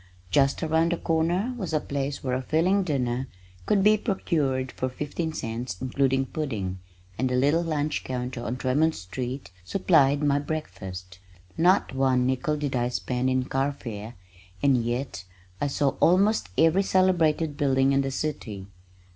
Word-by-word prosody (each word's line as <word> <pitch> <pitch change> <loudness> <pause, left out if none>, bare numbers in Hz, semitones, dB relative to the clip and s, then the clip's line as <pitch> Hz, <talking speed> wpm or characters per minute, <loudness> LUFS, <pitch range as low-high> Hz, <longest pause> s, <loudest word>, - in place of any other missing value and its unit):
Just 140 - +2
around 160 +2 +2
the - - -1
corner 170 +10 0
was 185 -6 -4
a 155 - +3
place 140 -1 -3
where 130 -2 -1
a 130 - -1
filling 170 +9 +2
dinner 130 -6 -1 0.4
could 200 -2 +3
be 215 +1 +6
procured 145 - -1
for 130 - -3
fifteen 150 +5 -3
cents, 115 -5 -4
including 135 +1 +1
pudding, 110 -12 -4 0.4
and 130 - +1
the 125 - 0
little 145 +6 +3
lunch 155 -3 -1
counter 125 -1 -4
on 120 +2 -3
Tremont 145 +6 +1
street 125 +7 -5
supplied 140 - +3
my 145 -1 +3
breakfast. 95 - -6 0.4
Not 180 -2 +3
one 130 -2 +2
nickel 130 +4 0
did 145 -3 -2
I 120 0 +1
spend 125 +1 -1
in 130 0 +1
carfare, 125 -6 -3 0.5
and 140 -2 +5
yet 120 -4 -3 0.4
I 145 - +2
saw 140 0 +1
almost 195 - +3
every 165 +4 +4
celebrated 165 -5 +2
building 135 -1 +2
in 135 0 +3
the 135 - -2
city. 120 -9 -4
140 Hz, 155 wpm, -26 LUFS, 125-160 Hz, 0.5 s, be